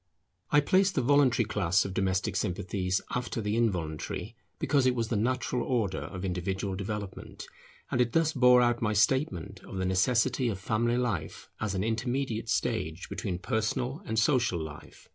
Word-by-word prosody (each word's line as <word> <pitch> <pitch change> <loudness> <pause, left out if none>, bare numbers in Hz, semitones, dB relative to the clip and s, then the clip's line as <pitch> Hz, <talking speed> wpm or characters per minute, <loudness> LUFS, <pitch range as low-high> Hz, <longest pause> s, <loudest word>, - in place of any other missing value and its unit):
I 150 - +5
placed 190 +6 +3
the 130 - +1
voluntary 130 -3 +4
class 95 -4 +1
of 95 - -4
domestic 95 0 0
sympathies 95 -1 -1
after 125 -1 -2
the 105 -1 -1
involuntary, 90 -10 -2 0.2
because 140 -3 +2
it 125 - +2
was 115 -2 -1
the 115 - 0
natural 125 +3 0
order 115 -6 0
of 95 +1 -6
individual 95 +2 -2
development, 100 0 -6 0.5
and 125 - +2
it 120 -1 +1
thus 165 -1 +2
bore 125 -2 +6
out 120 -1 +1
my 105 -2 +1
statement 100 - +1
of 95 - -8
the 95 - -1
necessity 120 +7 +2
of 100 - -3
family 115 +4 0
life 105 -11 -3
as 105 -3 -2
an 95 - 0
intermediate 115 +1 -2
stage 80 +3 -1
between 90 -4 -3
personal 120 - -2
and 110 - -2
social 115 -5 +2
life. 80 -1 -9
110 Hz, 165 wpm, -29 LUFS, 95-125 Hz, 0.5 s, bore